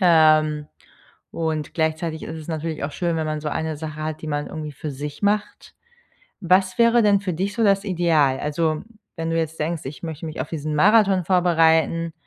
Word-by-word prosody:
Ähm, 155 -3 +4 0.6
und 160 -2 -3
gleichzeitig 160 0 -1
ist 160 - -6
es 155 0 -10
natürlich 160 -1 -4
auch 145 - -3
schön, 170 +1 -1
wenn 160 -1 -1
man 155 -1 -2
so 150 - -3
eine 160 +1 -3
Sache 155 0 -6
hat, 155 0 -4
die - - -6
man 145 -1 -2
irgendwie 155 -1 -6
für 150 +2 -6
sich 145 +4 -7
macht. 205 +1 -1 0.7
Was 185 +1 +2
wäre 235 0 +5
denn 205 -1 +4
für 195 -2 -3
dich 190 +5 -2
so 230 - -1
das 195 -1 +3
Ideal? 160 -8 +2
Also, 155 +1 -1 0.3
wenn 165 0 -3
du 165 - 0
jetzt 160 0 -3
denkst, 160 +1 -2
ich 140 +5 -8
möchte 160 -1 -6
mich 155 0 -6
auf - - -3
diesen 155 -1 -4
Marathon 195 +1 +4
vorbereiten, 165 -2 +2
160 Hz, 195 wpm, -22 LUFS, 155-180 Hz, 0.7 s, wäre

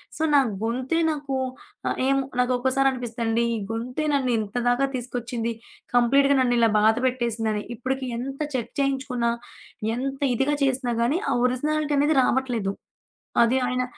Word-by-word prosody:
So, 315 - -2
నా - - +8 0.2
గొంతే 255 +7 -1
నాకు 285 -2 -4 0.6
ఆహ్, - - -2
ఏమో 275 0 +2 0.2
నాకు 250 0 +2
ఒక్కసారనిపిస్తదండి, 245 -3 0
ఈ - - -2
గొంతే 250 +6 -3
నన్ను 265 -3 +1
ఇంతదాగా 245 +5 +1
తీసుకొచ్చింది, 240 -1 -3 0.4
కంప్లీట్‌గా 275 +4 +4
నన్ను 245 -1 +2
ఇలా 230 -1 +5
బాధ 220 +1 +4
పెట్టేసిందని, 225 -4 -1
ఇప్పటికి 260 +2 -3
ఎంత 270 +4 -5
చెక్ 240 -3 -3
చేయించుకున్నా 265 -3 0 0.6
ఎంత 270 +2 -3 0.2
ఇదిగా 275 +4 +1
చేసినా 260 -2 +1
గానీ 285 +10 +1
ఆహ్, - - +1
ఒరిజినాలిటీ 295 +3 0
అనేది 300 +2 +3
రావట్లేదు. 240 -8 0 0.7
అది 240 +3 +3
ఆయన 250 0 0
250 Hz, 135 wpm, -24 LUFS, 235-270 Hz, 0.7 s, నా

